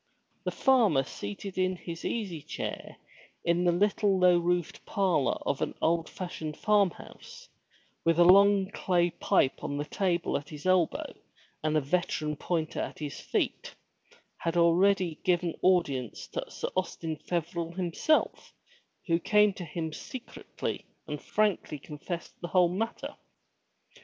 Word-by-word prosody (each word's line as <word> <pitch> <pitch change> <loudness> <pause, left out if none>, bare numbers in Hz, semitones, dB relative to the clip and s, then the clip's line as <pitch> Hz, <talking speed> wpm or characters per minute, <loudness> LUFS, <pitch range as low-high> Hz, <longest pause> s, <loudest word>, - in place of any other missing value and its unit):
The - - 0
farmer 220 - +4
seated 135 - -6
in 185 0 +2
his 170 -1 -8
easy 195 -9 -3
chair - - -6 0.5
in 170 +1 +2
the 175 - +5
little 200 +2 +2
low 180 -1 +5
roofed 175 +4 -1
parlor 185 -9 +1
of - - -1
an - - -2
old 165 0 +1
fashioned 160 -4 -6
farm 210 -3 +4
house, 485 - -13 0.6
with 165 -1 +3
a 175 - +7
long 195 +2 +6
clay 175 -3 +1
pipe 135 - +1
on 145 - -3
the 145 - -2
table 175 0 0
at 145 - -9
his 150 0 -9
elbow 185 -3 +2 0.5
and 155 0 +2
a - - +3
veteran 150 0 -1
pointer 165 +1 -2
at - - -5
his 150 -2 -5
feet, - - -2 0.6
had 165 +1 -2
already 175 0 +3
given 175 -2 +1
audience 145 -10 +1
to - - -5
Sir - - -4
Austin 165 -4 -2
Feverel 170 0 -3
himself 185 - 0 0.5
who 165 -2 +2
came 210 +2 +4
to 180 - -7
him 160 0 -4
secretly 255 - -6 0.2
and 150 -1 -5
frankly 210 -7 0
confessed 155 +4 -7
the 175 - -3
whole 180 -1 +4
matter. 220 +6 -4
175 Hz, 140 wpm, -29 LUFS, 160-190 Hz, 0.6 s, a